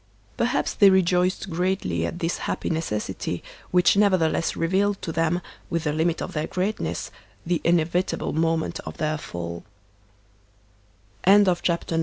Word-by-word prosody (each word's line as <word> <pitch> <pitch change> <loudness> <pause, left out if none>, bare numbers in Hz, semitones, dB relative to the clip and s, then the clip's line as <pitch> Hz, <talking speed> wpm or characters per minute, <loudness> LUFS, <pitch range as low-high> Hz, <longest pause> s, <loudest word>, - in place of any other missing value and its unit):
Per - - +1
haps - - 0
they 200 - +6
rejoiced 185 0 +2
greatly 165 - 0
at - - -5
this 170 0 -2
happy - - -2
necessity, 160 -10 -3 0.3
which 180 +1 +4
nevertheless 185 -5 +2
revealed 195 +4 +1
to 165 - -3
them, 165 +2 0 0.3
with 170 -2 -1
the 150 -2 0
limit 160 +2 0
of 185 - -6
their 155 -1 -2
greatness, 195 +3 -2 0.3
the 175 -1 0
inevitable 175 +2 +1
moment 165 +1 0
of - - -8
their 155 -1 -1
falL 85 -7 -6 1.6
CHAPTER 180 -4 +3
X. 165 - +1
170 Hz, 140 wpm, -24 LUFS, 160-185 Hz, 1.6 s, they